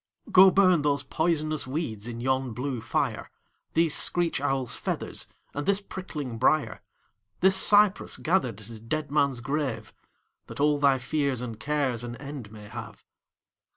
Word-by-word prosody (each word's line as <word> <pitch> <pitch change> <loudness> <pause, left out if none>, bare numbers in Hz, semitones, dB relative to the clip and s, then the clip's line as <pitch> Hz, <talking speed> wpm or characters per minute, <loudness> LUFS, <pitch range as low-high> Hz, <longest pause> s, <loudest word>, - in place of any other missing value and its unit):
Go 190 +1 +8
burn 185 -3 +4
those 145 -2 +1
poisonous 155 -1 -1
weeds 125 -7 -3
in 120 0 -6
yon 130 -1 0
blue 125 0 -3
fire, - - -2 0.5
These 165 -1 +3
screech 175 -5 +1
owl's 135 -3 +1
feathers - - -3 0.3
and 145 0 -4
this 200 0 +3
prickling 150 - -6
briar, 150 +4 +1 0.6
This 190 +1 +5
cypress 205 +1 +4
gathered 130 - 0
at 110 - -13
a 115 -2 -10
dead 145 +7 -4
man's 140 -4 +1
grave, 130 -5 -3 0.5
That - - -9
all 145 0 +3
thy 140 -2 +4
fears 140 0 -1
and 115 -3 -6
cares 140 -5 -1
an 120 0 -6
end 140 -5 -8
may 105 -1 -11
have. 110 - -9
140 Hz, 155 wpm, -27 LUFS, 120-155 Hz, 0.6 s, Go